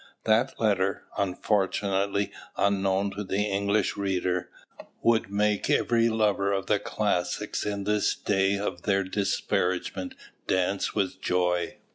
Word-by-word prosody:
That 115 +4 +2
letter, 100 -3 +1
unfortunately 100 +1 0 0.3
unknown 100 0 +1
to 100 +2 -5
the 100 +1 0
English 100 0 0
reader, 90 -2 -1 0.5
would 115 -4 +3
make 105 0 +1
every 115 -1 +3
lover 105 -3 +1
of 95 -1 -1
the 105 0 +2
classics 105 -2 -1
in 100 -1 -2
this 105 +1 +1
day 95 0 +1
of 100 - -3
their 100 -1 +1
disparagement 95 - -1 0.3
dance 95 +1 0
with 95 -2 -1
joy. 90 -2 0
100 Hz, 120 wpm, -27 LUFS, 95-105 Hz, 0.5 s, would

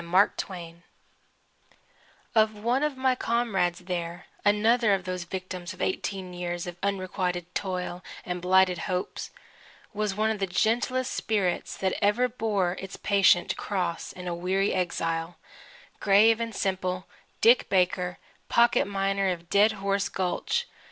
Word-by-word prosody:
DICK 170 - -11
BAKER'S 175 -2 0 1.5
CAT 220 -2 +5
One 235 +5 0
of 300 -3 -1
my 260 0 +3
comrades 220 -8 0
there 175 -1 -4 0.2
another 215 +1 +4
of 190 - -5
those 180 -1 -4
victims 185 -1 -6
of - - -16
eighteen 185 -1 -3
years 175 -1 -4
of 175 -1 -6
unrequited 185 -2 -2
toil 180 -2 -3 0.2
and 180 0 -3
blighted 185 -1 +4
hopes 180 0 -3 0.6
was 210 -2 -1
one 215 +1 +1
of 215 - -3
the 195 - 0
gentlest 240 +6 +1
spirits 195 -5 -1
that 190 -1 0
ever 220 +5 +3
bore 210 -7 -1
its 195 0 -7
patient 195 -3 +3
cross 180 -4 -2
in 180 -1 -8
a 175 - -1
weary 185 +3 0
exile: 165 -1 -2 0.6
grave 215 +3 +5
and 230 -2 -3
simple 185 -1 -1 0.3
Dick 235 +3 +5
Baker, 180 -1 +1 0.3
pocket 235 0 +4
miner 195 0 0
of 170 -1 -5
Dead 210 +2 +5
Horse 200 0 -1
Gulch. 185 - -1
190 Hz, 140 wpm, -27 LUFS, 180-210 Hz, 1.5 s, CAT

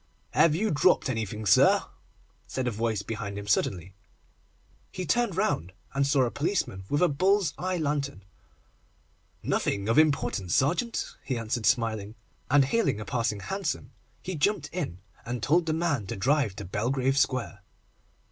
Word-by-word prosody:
'Have 155 -2 +4
you 215 +5 0
dropped 145 -2 +3
anything, 110 -2 -4
sir?' 95 - +5 0.6
said 130 -1 -3
a - - +1
voice 110 -2 -1
behind 105 -2 -5
him 100 - -6
suddenly. 95 -2 0 1.0
He 185 - -4
turned 200 +3 +1
round, 95 - 0 0.2
and 140 0 +1
saw 140 -2 +3
a 120 - 0
policeman 145 - -2
with 145 +4 +2
a - - +6
bull's 190 +5 +2
eye 185 0 -1
lantern. 140 - -2 1.2
'Nothing 100 0 -1
of 115 +7 +4
importance, 140 - +1
sergeant,' 180 - 0
he 130 - -2
answered, 115 0 -1
smiling, 110 -3 0 0.3
and 140 0 +5
hailing 180 - +1
a 105 - -6
passing 115 -4 -1
hansom, 185 - -3 0.3
he 185 - -4
jumped 155 -1 0
in, 165 - -3 0.3
and 120 -1 -4
told 170 +3 +3
the - - +2
man 160 - -1
to - - -4
drive 130 -1 +1
to 100 - -7
Belgrave 130 +8 0
Square. 130 -6 0
130 Hz, 155 wpm, -27 LUFS, 110-160 Hz, 1.2 s, a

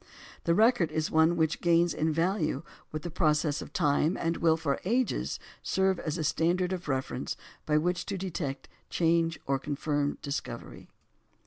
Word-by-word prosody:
The 170 - +3
record 220 -7 +4
is 155 0 -1
one 160 +2 +4
which 160 -1 +1
gains 170 -1 +3
in 160 +1 0
value 165 -3 0 0.3
with 155 0 -5
the 175 - -5
process 150 -3 +1
of - - -9
time, 150 +4 +2
and 165 0 -1
will 160 -1 +3
for 150 -4 -1
ages 240 +5 0 0.2
serve 190 -1 +1
as 155 +1 -3
a 160 - -2
standard 175 +4 +1
of 180 -2 -5
reference 130 -2 -2 0.3
by 150 - +3
which 175 +2 0
to 200 - -2
detect 165 -7 -4 0.2
change 165 -1 +2
or 135 0 +1
confirm 145 0 -1
discovery. 140 0 -5
165 Hz, 160 wpm, -29 LUFS, 150-175 Hz, 0.3 s, record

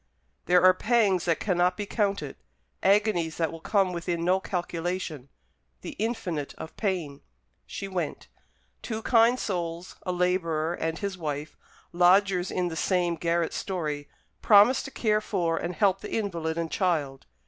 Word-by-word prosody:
There 180 +1 +5
are 185 0 +8
pangs 210 -2 +2
that 165 -2 +1
cannot 180 -2 +1
be 205 - -3
counted, 200 - -1 0.5
agonies 195 -5 +2
that 165 -2 0
will 165 - -8
come 195 -1 +1
within 170 -1 -2
no 185 +2 +3
calculation 175 -6 -4 0.5
the - - -6
infinite 185 -10 -3
of 160 - -9
pain. 175 -9 -2 0.5
She 195 - -5
went. 180 -5 -4 0.5
Two 220 -1 -5
kind 235 0 +4
souls, 175 -2 -4
a 180 - -3
labourer 175 -3 0
and 160 -1 -3
his 200 -2 -4
wife, 150 -1 -4 0.4
lodgers 180 +1 +4
in 180 -1 -1
the 165 - -6
same 175 0 +1
garret 170 0 -1
story, 150 -6 -3 0.3
promised 210 +4 +6
to - - -5
care 215 -4 +1
for 170 -6 -1
and 175 - -3
help 195 -2 +2
the - - -7
invalid 170 -6 -2
and 165 -1 -2
child. 150 -8 -1
180 Hz, 150 wpm, -27 LUFS, 165-195 Hz, 0.5 s, are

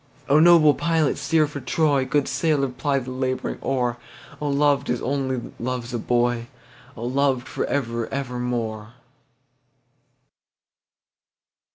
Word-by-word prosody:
O 145 +2 +5
noble 160 -2 +7
pilot 165 -2 +1
steer 155 +3 +2
for 145 -1 -6
Troy, 140 +1 +1
Good 135 +2 +1
sailor 140 0 +1
ply 140 +2 -1
the 130 -1 -4
labouring 130 0 -2
oar,O 130 +3 -4
loved 140 0 +2
as 125 0 0
only 130 -2 -2
loves 125 0 -4
a 120 - -1
boy!O 120 0 -3
loved 130 0 0
for - - -2
ever 115 -4 -2
evermore! 120 -4 -3
130 Hz, 110 wpm, -23 LUFS, 120-145 Hz, -, noble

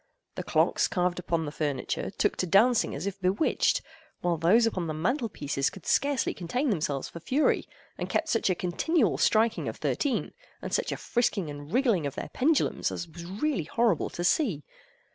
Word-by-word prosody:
The - - -4
clocks - - +2
carved 180 -2 0
upon 165 -2 -1
the 145 - -4
furniture 145 -4 -2
took - - 0
to 185 - -1
dancing 225 +7 +4
as 145 +6 -5
if 200 -1 -4
bewitched, 190 +11 +2 0.4
while 175 -1 +1
those 180 +9 +4
upon 185 -7 -1
the 155 - -3
mantel 230 - 0
pieces 140 -5 -1
could 190 - -13
scarcely 280 -3 +1
contain 245 - -1
themselves 150 -7 -1
for 170 - -9
fury, 260 - +1 0.3
and - - -3
kept - - 0
such 225 - +1
a 185 - +2
continual 235 - +1
striking 220 +1 +2
of - - -4
thirteen, 285 -4 -1 0.3
and - - -6
such - - 0
a - - -3
frisking 210 -9 0
and 145 +1 -9
wriggling 230 - +2
of 140 - -6
their - - -5
pendulums 295 +3 +1
as 175 - -5
was 170 +1 -10
really 205 - -1
horrible 230 +6 +1
to 175 - -5
see. 175 - +1
185 Hz, 185 wpm, -28 LUFS, 165-240 Hz, 0.4 s, dancing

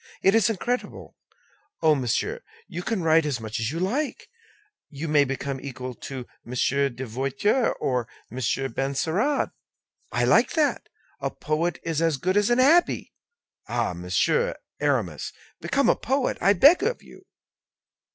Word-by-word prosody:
It 195 - +5
is 225 -1 +4
incredible! 240 +4 -3 0.7
Oh, 160 -1 +6
monsieur, 125 -5 -1 0.3
you 175 - -5
can 205 -1 -2
write 160 0 +4
as 145 -5 -2
much 110 -1 -4
as 110 +1 -1
you 165 - -3
like; 255 - -2 0.6
you 150 +3 -5
may 150 -2 +4
become 135 0 -4
equal 130 -2 -6
to 130 +1 -7 0.2
Monsieur 140 +3 +1
de 130 +1 -7
Voiture 135 - 0
and 125 -3 0 0.3
Monsieur 130 +2 -1
de 115 - -13
Benserade. 160 - 0 0.6
I - - 0
like - - +4
that. 310 -3 0 0.3
A - - -1
poet 160 +2 -2
is 165 -1 -1
as 165 -3 +2
good 185 +7 0
as 205 +1 +3
an 240 - +3
abbé. 305 +7 +3 0.6
Ah! 120 -5 -1
Monsieur 90 +1 +1 0.2
Aramis, 120 - -1 0.3
become 265 - +1
a - - +5
poet, 265 +2 -1
I 200 - +5
beg 285 - +6
of 470 +5 -1
you." - - -16
150 Hz, 150 wpm, -25 LUFS, 130-205 Hz, 0.7 s, Oh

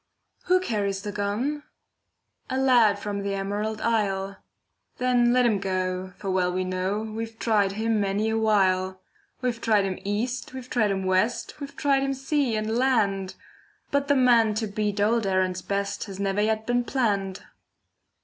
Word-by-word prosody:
Who 365 0 +4
carries 200 - -2
the 205 - -4
gun? 210 +9 -2 0.9
A 260 - -1
lad 245 -6 +4
from 205 0 -4
the 200 0 -2
Emerald 205 +2 -3
Isle. 195 -4 0 0.6
Then 245 -1 +3
let 250 0 +4
him 215 -4 +2
go, 185 -1 -2
for 195 -2 -3
well 180 -1 +1
we 185 +1 -1
know, 185 +3 -1
We've 225 +1 -6
tried 205 -4 +2
him 220 0 0
many 200 +2 0
a 225 - 0
while. 190 -3 +2 0.4
We've 240 -2 -1
tried 210 -3 +3
him 190 -1 -3
east, 235 +5 -3
we've 255 -1 -8
tried 215 -4 +2
him 190 -1 -1
west, 185 +10 0
We've 280 -1 -8
tried 275 -1 +2
him 275 0 -1
sea 270 -2 0
and 215 +1 -1
land, 200 -7 +1 0.6
But 280 0 +1
the 285 - +3
man 235 -4 +4
to 220 +1 -1
beat 210 0 -2
old 220 +1 +2
Erin's 185 -1 0
best 200 0 -2
Has 195 -2 -8
never 200 +1 0
yet 220 +1 0
been 245 +1 +1
planned. 200 -7 -1
210 Hz, 170 wpm, -25 LUFS, 195-240 Hz, 0.9 s, Who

